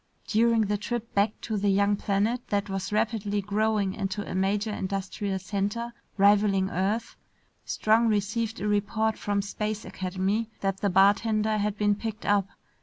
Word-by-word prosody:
During 230 0 +3
the 205 -1 0
trip 235 +2 -4
back 205 +1 +1
to 220 -2 -2
the 200 0 +1
young 200 +1 +3
planet 210 +5 -1
that 200 -1 -1
was 195 +1 -3
rapidly 210 -1 0
growing 205 -1 0
into 200 0 -3
a - - -5
major 200 +3 0
industrial 195 0 -3
center 205 +5 -3 0.2
rivaling 200 -1 +4
Earth, 205 +6 -1 0.5
Strong 225 +2 +2
received 220 +2 -1
a 205 - -2
report 215 +2 +1
from 205 -1 -1
Space 210 +1 -3
Academy 190 +4 -2
that 195 -1 0
the 200 - +1
bartender 215 +3 +3
had 205 0 -1
been 205 0 +3
picked 220 +1 -5
up. 205 -2 +2
205 Hz, 155 wpm, -27 LUFS, 195-215 Hz, 0.5 s, rivaling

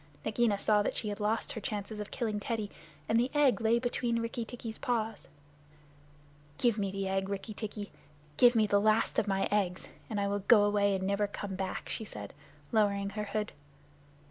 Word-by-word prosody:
Nagaina 220 -1 +2
saw 210 +1 +3
that - - -1
she 215 - -2
had 205 0 -4
lost 215 +2 0
her 220 - -5
chance 205 0 -4
of 210 -1 -5
killing 220 -4 -2
Teddy, 215 -1 -3 0.4
and 225 - +3
the 245 +2 +2
egg 280 -5 +4
lay 225 +1 +4
between 240 -1 0
Rikki 230 +1 -3
tikki's 225 -1 -7
paws. 225 -3 -2 1.3
"Give 235 -3 +2
me 200 -1 0
the 195 0 -3
egg, 190 0 -1
Rikki 200 +2 -4
tikki. 210 -1 -6 0.4
Give 245 +8 +6
me 220 -1 +5
the 205 -1 +3
last 215 +1 +3
of 210 - -1
my 195 -1 +1
eggs, 190 -3 0 0.2
and 210 - -1
I 200 - +1
will 200 0 0
go 205 +1 +6
away 205 -1 +3
and 190 0 -2
never 200 +1 +1
come 200 -1 -5
back," 190 0 -3
she - - -4
said, 105 - -7 0.4
lowering 200 -2 +2
her 210 +1 -3
hood. 210 +1 -2
210 Hz, 195 wpm, -31 LUFS, 200-225 Hz, 1.3 s, Give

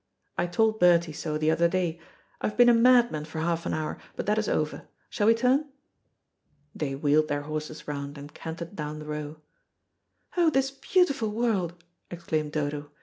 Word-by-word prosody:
"I 175 - 0
told 220 +5 +1
Bertie 170 -2 +4
so 150 0 -3
the 155 +1 +2
other 170 +1 +3
day. 170 -2 -1 0.4
I - - +1
have 210 - -5
been 245 0 +7
a - - +7
madman 235 -9 +4
for 160 +1 -9
half 165 +1 -1
an - - -1
hour, 155 -1 -3 0.2
but - - -4
that 210 +1 +2
is 215 - -1
over. 155 -1 -2 0.2
Shall 210 -2 +1
we 225 - +6
turn?" 260 +5 +2 1.0
They 135 -3 -3
wheeled 150 +2 +2
their 145 -1 -2
horses 155 +1 -6
round, 145 0 -5
and 145 +1 -10
cantered 170 +3 -7
down 150 -2 -4
the 155 - -8
Row. 150 0 -6 0.9
"Oh, 345 -2 +4
this 270 -2 +1
beautiful 275 - +1
world," 200 -7 -1 0.3
exclaimed 160 -3 -3
Dodo. 145 -1 -3
170 Hz, 180 wpm, -27 LUFS, 150-220 Hz, 1.0 s, been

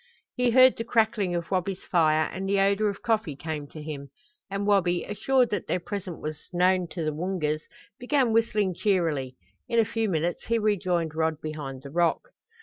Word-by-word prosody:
He 250 -1 +2
heard 255 +2 +6
the 230 - -2
crackling 220 -5 +1
of 170 +1 -4
Wabi's 185 0 -1
fire 155 -3 +3
and 195 +1 -4
the 200 0 +2
odor 200 +2 +3
of 200 - -7
coffee 220 -10 0
came 150 0 -5
to 155 +1 -10
him; 140 -2 -6 0.4
and 200 +1 -2
Wabi, 180 -4 +2
assured 250 +4 +1
that 205 -4 -2
their 180 - 0
presence 185 -1 -6
was 155 0 -7
known 180 0 +2
to 165 0 -4
the 155 - -1
Woongas, 155 -2 -1 0.4
began 250 -2 +1
whistling 215 -4 +2
cheerily. 165 - 0 0.3
In 235 - 0
a 225 - +5
few 225 0 -1
minutes 170 0 -1
he 230 - +2
rejoined 180 -7 0
Rod 160 -1 0
behind 145 -4 -6
the 140 - -9
rock. 170 - +1
185 Hz, 185 wpm, -26 LUFS, 160-210 Hz, 0.4 s, heard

